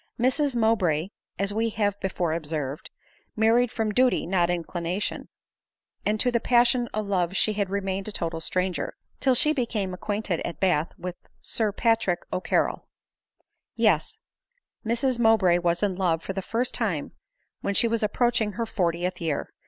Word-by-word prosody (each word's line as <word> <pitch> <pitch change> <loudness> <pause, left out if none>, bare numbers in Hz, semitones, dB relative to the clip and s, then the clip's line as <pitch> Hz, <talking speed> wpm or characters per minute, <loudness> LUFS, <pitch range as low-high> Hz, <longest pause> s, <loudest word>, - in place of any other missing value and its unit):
Mrs 260 +2 +2
Mow 225 -1 +4
bray, 175 -2 0 0.3
as 200 +1 0
we 225 +2 +1
have 205 -2 -1
before 175 -4 -1
observed, 150 -3 -3 0.5
married 225 +2 +3
from 220 -2 -1
duly, 255 +3 +3
not 175 -1 +2
inclination; 175 +2 -2 0.8
and 215 +1 +1
to 245 - +2
the 235 - +2
passion 240 0 +3
of 215 0 -2
love 185 -2 0
she 215 - +3
had 200 -2 -1
re 200 +1 -1
mained 195 +1 -3
a - - -4
total 165 -4 -3
stranger, 180 +2 -1 0.2
till 260 -2 +3
she 305 +5 +3
became 220 -8 -2
acquainted 205 -1 -2
at 170 - -5
Bath 175 -4 +2
with 180 0 -6 0.2
Sir 220 -2 0
Patrick 220 -5 +1
O'Carrol. 185 - 0 0.9
Yes; 215 - +2 0.7
Mrs 240 +2 0
Mowbray 215 -7 +4
was 175 +2 0
in 195 -3 +1
love 170 -3 0
for 195 - -4
the 195 - -3
first 230 +6 -1
time - - -1 0.5
when 200 - -2
she 235 - +4
was 230 0 0
approaching 220 0 +1
her 230 +2 -2
fortieth 180 -3 -1
year 160 -4 -2
200 Hz, 160 wpm, -26 LUFS, 175-230 Hz, 0.9 s, Mow